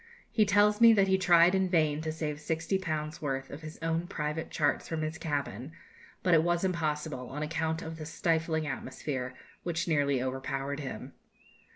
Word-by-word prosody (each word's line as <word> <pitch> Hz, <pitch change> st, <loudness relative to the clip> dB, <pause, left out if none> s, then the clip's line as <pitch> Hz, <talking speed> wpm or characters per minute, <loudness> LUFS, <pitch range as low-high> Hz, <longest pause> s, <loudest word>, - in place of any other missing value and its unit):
He 215 Hz, -, +4 dB
tells 205 Hz, +2 st, +4 dB
me 230 Hz, -1 st, +9 dB
that 195 Hz, -2 st, +4 dB
he 190 Hz, 0 st, +3 dB
tried 175 Hz, -1 st, +6 dB
in 190 Hz, -1 st, +2 dB
vain 155 Hz, -4 st, +2 dB
to 160 Hz, 0 st, -2 dB
save 155 Hz, -2 st, -3 dB
sixty 160 Hz, +4 st, -1 dB
pounds' 155 Hz, -1 st, -3 dB
worth 135 Hz, -2 st, -3 dB
of 145 Hz, -, -8 dB
his 155 Hz, 0 st, -8 dB
own 165 Hz, +1 st, 0 dB
private 150 Hz, -2 st, -3 dB
charts 145 Hz, -1 st, 0 dB
from 160 Hz, -1 st, -2 dB
his 155 Hz, +1 st, -4 dB
cabin, 145 Hz, -, -3 dB, 0.5 s
but 180 Hz, -, +3 dB
it 160 Hz, -, +7 dB
was 175 Hz, +1 st, +1 dB
impossible, 155 Hz, -7 st, -2 dB
on 150 Hz, +3 st, -4 dB
account 160 Hz, +1 st, -1 dB
of 160 Hz, 0 st, -6 dB
the 155 Hz, -1 st, -7 dB
stifling 160 Hz, -1 st, 0 dB
atmosphere, 130 Hz, -2 st, -4 dB, 0.3 s
which 170 Hz, 0 st, -2 dB
nearly 145 Hz, -4 st, +2 dB
overpowered 135 Hz, +2 st, -3 dB
him. 135 Hz, -3 st, -6 dB
160 Hz, 180 wpm, -30 LUFS, 145-170 Hz, 0.5 s, me